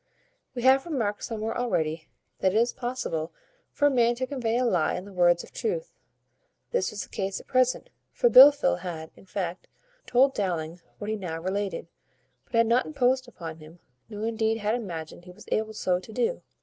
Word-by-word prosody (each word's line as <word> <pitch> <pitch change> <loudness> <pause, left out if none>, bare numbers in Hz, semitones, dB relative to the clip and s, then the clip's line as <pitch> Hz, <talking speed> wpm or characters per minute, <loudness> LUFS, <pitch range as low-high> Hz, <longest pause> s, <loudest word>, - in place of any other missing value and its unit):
We 245 - -4
have 265 +3 +5
remarked 225 -10 -2
somewhere 225 -1 -3
already, 160 -10 -1 0.3
that 190 +1 +2
it - - +4
is 235 +2 +2
possible 240 -11 -3 0.4
for 290 - 0
a 290 - +5
man 240 -2 +3
to 255 +2 -2
convey 240 -4 -1
a 250 - +1
lie 180 -9 +1
in 180 - -5
the 200 - -12
words 175 -1 +3
of - - -14
truth; 475 +2 -3 0.8
this 485 - +1
was 210 - -5
the - - -14
case 195 -1 -3
at - - -14
present; 255 0 +1 0.2
for 485 - +2
Blifil 285 - +7
had, 165 -3 -6
in - - -18
fact, 185 -2 -4 0.4
told 265 +2 +4
Dowling 170 -5 -3 0.2
what 210 +1 -4
he - - 0
now 175 -6 -5
related, 195 +3 -3 0.6
but - - -8
had 230 0 +5
not 235 +3 +2
imposed 260 -3 +1
upon 165 -9 -8
him, 160 +2 -14 0.3
nor 210 0 -5
indeed 225 0 0
had 210 0 -1
imagined 175 -7 -5
he 180 - -11
was 180 - -15
able 220 0 0
so 180 -4 0
to 185 - -12
do. 470 - -1
220 Hz, 195 wpm, -27 LUFS, 180-250 Hz, 0.8 s, Blifil